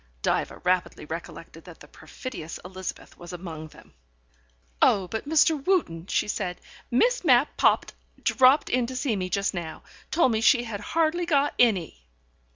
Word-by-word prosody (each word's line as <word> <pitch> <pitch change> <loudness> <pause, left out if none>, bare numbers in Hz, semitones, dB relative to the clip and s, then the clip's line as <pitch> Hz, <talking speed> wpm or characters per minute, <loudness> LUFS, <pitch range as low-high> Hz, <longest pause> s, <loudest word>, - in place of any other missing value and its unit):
Diva - - 0
rapidly 180 -3 0
recollected 165 0 -8
that 175 -2 -13
the 145 - -14
perfidious 160 +2 -8
Elizabeth 185 0 -7
was 175 +1 -9
among 165 -3 -7
them. - - -18 0.9
"Oh, 190 -2 +4
but, 220 +9 -5
Mr. 315 -2 +3
Wootten," 190 - 0
she - - +1
said, 185 -4 -3 0.3
"Miss 485 - +2
Mapp 265 -3 +4
popped - - +2 0.3
dropped 265 +3 +4
in 250 -1 +1
to 260 - -6
see 255 -3 -1
me 185 -2 -3
just 200 +2 0
now. 170 -3 -6 0.3
Told 310 -6 +3
me 220 -1 0
she 240 +1 +4
had 220 -4 -5
hardly 330 - 0
got 290 -3 +2
any." 185 - +1
210 Hz, 160 wpm, -26 LUFS, 175-275 Hz, 0.9 s, Oh